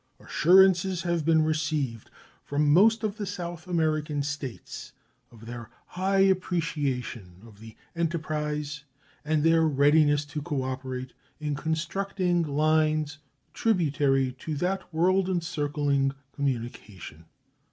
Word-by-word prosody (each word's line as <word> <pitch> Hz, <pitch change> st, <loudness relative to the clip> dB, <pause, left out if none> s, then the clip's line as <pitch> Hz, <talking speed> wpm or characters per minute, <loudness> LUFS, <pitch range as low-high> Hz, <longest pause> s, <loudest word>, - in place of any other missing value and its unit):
Assurances 185 Hz, +1 st, +4 dB
have 170 Hz, -2 st, 0 dB
been 160 Hz, -1 st, +4 dB
received 155 Hz, -7 st, -1 dB, 0.3 s
from 145 Hz, 0 st, +1 dB
most 220 Hz, +6 st, +5 dB
of 215 Hz, -1 st, -2 dB
the 210 Hz, -, -3 dB
South 175 Hz, -3 st, -6 dB
American 155 Hz, -4 st, 0 dB
States 140 Hz, -4 st, -6 dB, 0.4 s
of 115 Hz, -1 st, -15 dB
their 120 Hz, -1 st, -8 dB, 0.2 s
high 195 Hz, +2 st, +1 dB
appreciation 145 Hz, -, -1 dB
of 105 Hz, -3 st, -16 dB
the 110 Hz, 0 st, -12 dB, 0.2 s
enterprise 150 Hz, -3 st, -2 dB, 0.4 s
and 150 Hz, 0 st, +1 dB
their 165 Hz, 0 st, +4 dB
readiness 145 Hz, 0 st, +3 dB
to 150 Hz, +1 st, -5 dB
cooperate 130 Hz, -2 st, -4 dB, 0.3 s
in 150 Hz, -1 st, -2 dB
constructing 175 Hz, +4 st, -1 dB
lines 155 Hz, 0 st, +1 dB, 0.3 s
tributary 145 Hz, -, +1 dB
to 155 Hz, -, -4 dB
that 180 Hz, +6 st, -2 dB
world 185 Hz, +3 st, +2 dB
encircling 145 Hz, -5 st, 0 dB, 0.2 s
communication. 115 Hz, -, -5 dB
155 Hz, 110 wpm, -27 LUFS, 140-170 Hz, 0.4 s, most